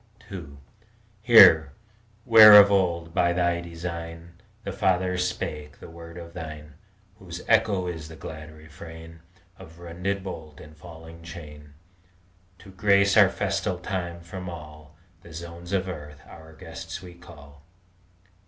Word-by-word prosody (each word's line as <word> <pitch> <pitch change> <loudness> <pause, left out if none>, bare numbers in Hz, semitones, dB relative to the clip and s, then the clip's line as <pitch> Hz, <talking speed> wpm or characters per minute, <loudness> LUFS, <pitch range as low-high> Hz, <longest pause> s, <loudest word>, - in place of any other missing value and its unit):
II 80 -7 -9 0.6
Here, 80 - +7 0.5
where 110 -2 +9
of 100 0 +6
old, 85 -4 0
by 85 -1 +2
Thy 85 -1 0
design, 85 0 -8 0.3
The - - -5
fathers 90 -1 0
spake 75 -4 -7
that - - -12
word 85 0 -12
of 85 -1 -10
Thine 75 -3 -9 0.5
Whose 85 -1 -9
echo 105 -4 +2
is 80 -3 -6
the 80 - -12
glad 80 -1 -10
refrain 80 +1 -13 0.4
Of 85 -3 -14
rended 90 +3 -4
bolt 80 -6 -9
and 75 0 -14
falling 80 +1 -13
chain, 75 -3 -12 0.8
To 95 +1 -15
grace 100 +1 +2
our 100 -3 +7
festal 100 -2 -2
time, 90 -2 -5
from 90 +2 -8
all 75 -2 -12 0.3
The 85 - -15
zones 85 +2 -9
of 95 -1 -1
earth 75 -4 -9
our 80 0 -14
guests 80 +2 -9
we 90 -1 -11
call. 75 -5 -16
85 Hz, 135 wpm, -25 LUFS, 80-90 Hz, 0.8 s, where